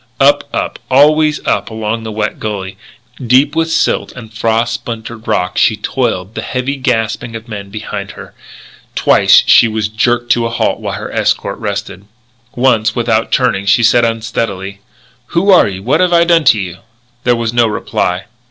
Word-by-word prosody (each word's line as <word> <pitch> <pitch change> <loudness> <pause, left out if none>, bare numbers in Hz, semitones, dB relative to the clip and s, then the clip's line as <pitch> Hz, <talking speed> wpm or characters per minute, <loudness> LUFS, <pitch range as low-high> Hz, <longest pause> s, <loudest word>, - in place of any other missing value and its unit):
Up, - - +4
up, - - -3
always 150 +3 +3
up - - 0
along 110 0 -3
the 110 0 -6
wet 105 0 -3
gully, 100 -3 -5 0.5
deep 130 +5 +3
with 165 0 0
silt - - 0
and 110 -3 -11
frost 115 +2 0
splintered 115 -1 -7
rock, 100 -4 0
she 110 - +3
toiled, 105 -4 -2
the - - -4
heavy 130 +2 -3
gasping 120 -2 -2
of 115 +1 -8
men 100 -3 -7
behind 105 +2 -6
her. - - -12 0.6
Twice - - +5
she - - +6
was 110 -1 -2
jerked 120 +2 0
to 120 -1 +2
a - - -5
halt 115 - -1
while - - -4
her - - -6
escort - - -1
rested. 95 - -5 0.5
Once, 115 -3 +2
without 115 -2 0
turning, 115 -7 +1
she 115 +4 +4
said 120 +1 +4
unsteadily: 110 -4 -3 0.6
"Who 195 +4 +4
are 185 - +6
you? 95 -1 -6
What 135 +8 +1
have 180 -1 +2
I 170 0 +5
done 170 -2 +3
to 110 - +5
you?" 95 -1 -6 0.4
There 120 0 +3
was 115 -1 -2
no 120 -1 +3
reply. 90 -3 -2
115 Hz, 175 wpm, -14 LUFS, 105-125 Hz, 0.6 s, she